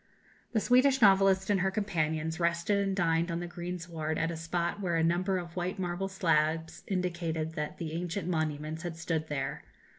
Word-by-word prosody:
The 220 - +3
Swedish 255 +4 +4
novelist 195 -2 +5
and 200 - +3
her 190 +2 +2
companions 160 -5 -1
rested 170 +4 +1
and 195 -1 0
dined 165 -2 +2
on 170 0 -1
the 175 - -4
greensward 170 -3 -4
at 165 +1 0
a - - -4
spot 170 +3 -2
where 175 -3 0
a 165 - +2
number 180 +3 +2
of 170 -2 -6
white 180 +1 -2
marble 180 +1 -2
slabs 160 -4 +1
indicated 170 -4 -1
that 150 -1 -4
the 160 -2 -4
ancient 175 +1 -3
monuments 155 -2 -2
had 170 -2 -5
stood 160 -2 -2
there. 135 -3 -3
170 Hz, 180 wpm, -30 LUFS, 160-190 Hz, -, novelist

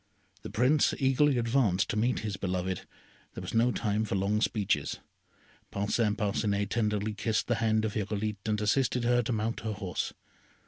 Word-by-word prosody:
The - - -7
Prince 135 +6 +3
eagerly 135 +1 +3
advanced 115 -5 +2
to - - -3
meet 120 +3 +1
his 105 -2 -3
beloved, 95 -1 -3 0.5
there - - -5
was - - -6
no 115 +2 +3
time 105 -2 0
for 105 - -2
long 100 +2 +1
speeches, 105 -5 0 0.7
Parcin 105 +1 0
Parcinet 100 -1 0
tenderly 105 -2 0
kissed 110 +1 0
the 120 - +1
hand 110 -1 +2
of 105 - -2
Irolite 105 0 -2
and 105 -1 +1
assisted 125 +3 +1
her 120 +1 +3
to 120 - -3
mount 115 0 -1
her 110 -1 -3
horse. 95 -4 -3
110 Hz, 170 wpm, -29 LUFS, 100-120 Hz, 0.7 s, Prince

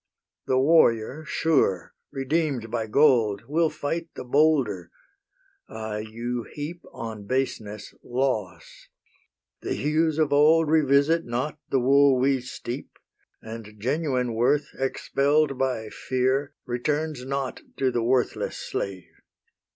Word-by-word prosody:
The 130 - +2
warrior, 135 -1 +3
sure, 135 - +1 0.2
redeem'd 135 -4 -1
by 115 -2 -2
gold, 115 -5 +3
Will 160 +3 +2
fight 165 +4 -4
the - - -6
bolder! 125 - +2 0.8
Aye, 110 -1 -5
you 120 +2 -3
heap 155 +4 -6
On 110 -3 -7
baseness 110 -5 -3
loss. 120 -7 -3 0.7
The - - -2
hues 155 +1 +1
of 155 -3 +2
old 155 +2 +5
Revisit 155 +2 +3
not 130 +6 -3
the 135 - +2
wool 135 +1 +5
we 135 0 +2
steep; 125 +1 -7 0.5
And 110 -1 -9
genuine 130 -1 -1
worth, 140 +6 +2
expell'd 140 +1 +1
by 125 -5 -1
fear, 130 +4 -1
Returns 145 +3 -2
not 135 0 -3 0.2
to 130 -1 +1
the 120 - 0
worthless 125 +2 0
slave. 95 -2 -4
130 Hz, 115 wpm, -25 LUFS, 115-150 Hz, 0.8 s, old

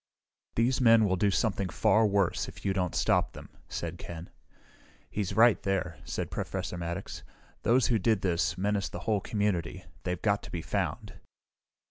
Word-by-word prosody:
"These 125 +3 +2
men 115 -2 +6
will 95 -2 +2
do 100 +3 +2
something 100 -2 0
far 110 +7 +3
worse, 100 -3 +1
if - - -11
you 95 - +2
don't 90 -3 -1
stop - - +2
them," - - -11 0.2
said 85 +1 -4
Ken. 85 0 -8 0.8
"He's 100 -3 -2
right, 115 0 +6
there," 90 -5 -1
said - - -4
Professor - - -3
Maddox. 85 +2 -5 0.4
"Those 120 +1 +3
who 115 -3 +2
did 110 0 +2
this, 90 -2 +1
menace 100 +1 0
the - - -7
whole 105 -3 0
community. 100 -6 -1 0.2
They've 90 -1 -3
got 100 0 +1
to - - -10
be 85 -2 -4
found." - - -3
100 Hz, 165 wpm, -29 LUFS, 90-110 Hz, 0.8 s, men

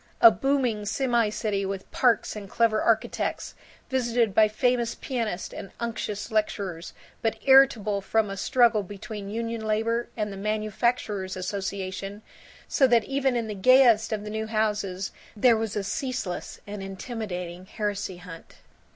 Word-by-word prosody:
A 230 - +10
booming 260 -6 0
semi 235 -1 +1
city 210 -1 -2
with 195 0 -5
parks 240 -4 +2
and 200 -2 -8
clever 230 0 +2
architects, 225 -1 0 0.4
visited 240 -4 +1
by 215 +1 +6
famous 240 +1 0
pianists 230 -8 -3
and 195 - -7
unctuous 220 -2 -4
lecturers, 200 -6 -2 0.3
but 225 -1 0
irritable 240 -7 +5
from 220 +2 +1
a - - -4
struggle 235 +1 +3
between 200 +1 -7
union 230 +1 -3
labor 225 +2 0
and 210 -2 -2
the - - -8
manufacturers' 210 -1 -1
association, 195 +1 -4 0.4
so 270 - +4
that 235 -3 +4
in 275 - -12
even 265 -4 +1
the 215 - -4
gayest 235 +1 +5
of 215 -2 -2
the 210 - -6
new 220 0 -3
houses 210 -4 -1 0.2
there 235 +2 +5
was 220 -2 -2
a 205 - -1
ceaseless 250 - -4
and 205 -1 -6
intimidating 190 -3 -6
heresy 205 -3 -3
hunt. 175 -2 -12
215 Hz, 145 wpm, -26 LUFS, 200-235 Hz, 0.4 s, A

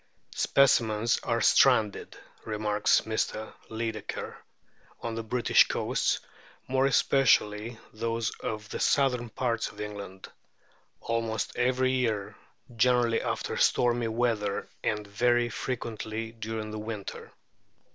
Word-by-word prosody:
" - - -44 0.2
Specimens 115 -4 +3
are - - -1
stranded," 105 -2 +3 0.3
remarks 105 -1 +1
Mr. 110 0 -3 0.2
Lydekker, 110 -1 -4 0.6
"on 115 - -4
the 115 - -3
British 120 +2 +3
coasts, - - 0 0.5
more 130 +1 +2
especially 115 -5 +2 0.2
those 115 +1 -2
of 110 -1 -4
the - - -5
southern 125 -5 +2
parts 115 -1 -1
of - - -12
England, 100 -2 -7 0.7
almost 115 -2 -2
every 130 +1 +2
year, 110 -6 -1 0.4
generally 120 -1 +3
after - - -3
stormy 120 -1 +2
weather 110 -3 -1 0.2
and 105 -1 -1
very 120 +4 +2
frequently 115 -3 -4
during 110 -1 -5
the 110 - -5
winter." 105 -2 -6
115 Hz, 110 wpm, -28 LUFS, 110-120 Hz, 0.7 s, Specimens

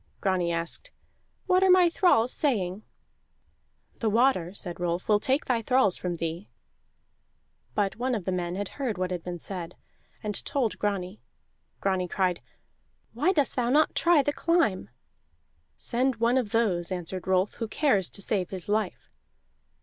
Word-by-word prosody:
Grani 185 -3 0
asked: 170 - -2 0.6
"What 370 0 +3
are 380 - +4
my 365 -1 +7
thralls 330 - +3
saying?" 205 - 0 1.2
"The 225 - +1
water," 225 -6 +2
said 175 -3 -5
Rolf, 175 0 -2
"will 210 -1 +4
take 265 +6 0
thy 240 -3 +1
thralls 250 -5 +3
from 180 -1 -3
thee." 165 +3 -5 1.3
But 200 -1 0
one 250 +1 0
of 200 -6 -4
the 190 - -1
men 175 -1 -2
had 200 0 -3
heard 255 -8 -3
what 185 0 -2
had 180 -2 -3
been 175 +1 -5
said, 175 0 -6 0.5
and 210 -2 -2
told 270 -6 -1
Grani. 200 -1 -2 0.6
Grani 190 -2 0
cried: 180 -1 0 0.7
"Why 295 +11 +2
dost 295 -7 +1
thou 240 -2 0
not 300 +4 +3
try 335 -4 +4
the 290 - 0
climb?" 305 - +1 0.9
"Send 255 +2 0
one 235 +3 +2
of 230 -5 -3
those," 195 -6 +1
answered 185 0 -5
Rolf, 190 +1 +2
"who 225 - -1
cares 215 - +1
to 200 - -3
save 185 -4 0
his 185 -3 -6
life." 210 -2 -2
205 Hz, 155 wpm, -27 LUFS, 180-255 Hz, 1.3 s, my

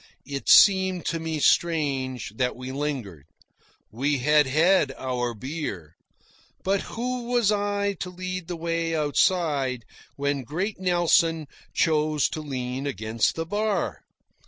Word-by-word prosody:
It 140 -1 -5
seemed 190 -3 +6
to 165 - -2
me 160 -1 -3
strange 135 -9 +1
that 125 -1 0
we 130 +1 -7
lingered. 130 - -4 0.7
We 140 +6 0
had 150 +2 +3
had 155 +1 +3
our 125 -3 -3
beer. 105 - -6 0.7
But 195 +1 +1 0.2
who 250 +1 -2
was 240 -3 +2
I 205 -1 0
to 180 - -4
lead 185 -1 -5
the 180 - -4
way 165 0 -2
outside 145 - +1 0.3
when 140 0 -1
great 180 - -3
Nelson 170 -3 +2 0.3
chose 155 -2 +2
to 155 - -5
lean 130 -1 -4
against 110 -4 -1
the 165 - -3
bar? 185 - -1
155 Hz, 130 wpm, -25 LUFS, 130-180 Hz, 0.7 s, seemed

